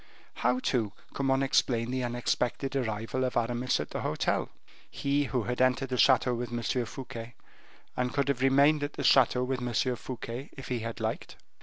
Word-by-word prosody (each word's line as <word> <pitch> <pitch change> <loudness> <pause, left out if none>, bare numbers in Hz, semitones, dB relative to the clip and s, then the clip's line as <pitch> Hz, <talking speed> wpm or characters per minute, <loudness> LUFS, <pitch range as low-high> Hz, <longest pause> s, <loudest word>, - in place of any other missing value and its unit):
How, 125 +1 +2
too, 115 -5 0 0.2
can 135 - -1
one 135 0 +3
explain 120 -3 +1
the 130 0 -1
unexpected 120 +2 -1
arrival 115 0 -1
of 130 - -1
Aramis 120 +2 0
at - - -5
the - - -3
hotel - - 0 0.4
he 140 +1 0
who 125 -3 -1
had 125 +2 -2
entered 130 +1 +2
the 125 - -1
chateau 125 +1 +5
with 120 0 -3
M. 120 0 -3 0.2
Fouquet, 120 -3 -8 0.6
and 125 0 0
could 140 -1 0
have 140 -2 0
remained 140 +3 +5
at 145 0 -3
the - - -5
chateau 125 -1 +5
with 130 0 -2
M. 125 +1 0
Fouquet 125 +2 -6
if 135 - -8
he 125 -2 -1
had 115 0 -5
liked? - - -3
125 Hz, 185 wpm, -29 LUFS, 120-135 Hz, 0.6 s, chateau